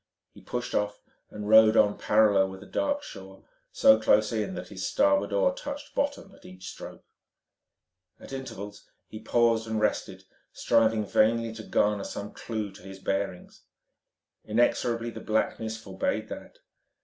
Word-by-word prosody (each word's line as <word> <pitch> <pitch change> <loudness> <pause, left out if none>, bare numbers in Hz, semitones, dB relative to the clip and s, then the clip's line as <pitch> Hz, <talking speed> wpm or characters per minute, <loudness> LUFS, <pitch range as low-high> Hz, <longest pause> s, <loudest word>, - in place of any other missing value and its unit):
He - - -15
pushed 120 0 -5
off 105 0 -1 0.3
and 105 -1 -7
rowed 110 +1 +7
on 105 0 +4
parallel 105 -3 +3
with 95 +1 -10
a - - -13
dark 290 - -1
shore 95 0 -10
line, - - -23 0.3
so 110 0 +5
close 105 -1 +3
in 105 -4 -2
that - - -7
his 95 -2 -7
starboard 290 +1 +2
oar - - +2
touched 290 -13 -7
bottom 280 -8 -2
at - - -19
each 95 0 -11
stroke. - - -11 1.1
At - - -11
intervals 105 -6 -8 0.2
he 110 - -8
paused 115 0 +2
and 110 -1 -1
rested, 105 -1 -1 0.3
striving 110 -1 +2
vainly 115 +2 +2
to 110 - -8
garner 105 -2 +1
some 100 +1 -6
clue 110 -3 -5
to 95 - -15
his 95 +1 -10
bearings. 95 -1 -4 0.8
Inexorably 115 +1 +1
the - - -9
blackness 110 0 -1
forbade 95 -4 -3
that. - - -9
110 Hz, 155 wpm, -27 LUFS, 100-115 Hz, 1.1 s, rowed